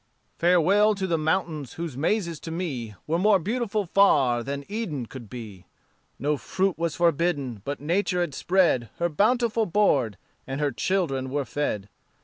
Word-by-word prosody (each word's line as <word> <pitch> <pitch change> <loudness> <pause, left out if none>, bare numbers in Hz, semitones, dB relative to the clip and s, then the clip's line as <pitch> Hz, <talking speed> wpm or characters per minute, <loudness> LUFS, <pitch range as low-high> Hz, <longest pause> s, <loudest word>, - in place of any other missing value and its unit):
"Farewell 185 +5 +4
to 195 -1 -2
the 170 -3 +1
mountains 155 -3 -1
whose 165 -5 -5
mazes 170 +2 0
to - - -8
me 140 - -4
Were 165 +2 0
more 205 +1 +5
beautiful 215 +2 -1
far 140 -11 +4
than 140 +3 -5
Eden 200 - -3
could 120 -2 -10
be; 105 -7 -9 0.5
No 145 +2 0
fruit 190 +5 -1
was 165 -1 -2
forbidden, 150 - +1
but 145 0 -3
Nature 180 +4 0
had 170 -5 -2
spread 170 - +2
Her 170 0 0
bountiful 225 +5 +2
board, 140 - +2 0.3
and 135 +1 -4
her 145 -1 +1
children 135 -3 -1
were 140 +1 -1
fed. 115 -6 -2
165 Hz, 155 wpm, -26 LUFS, 135-190 Hz, 0.5 s, more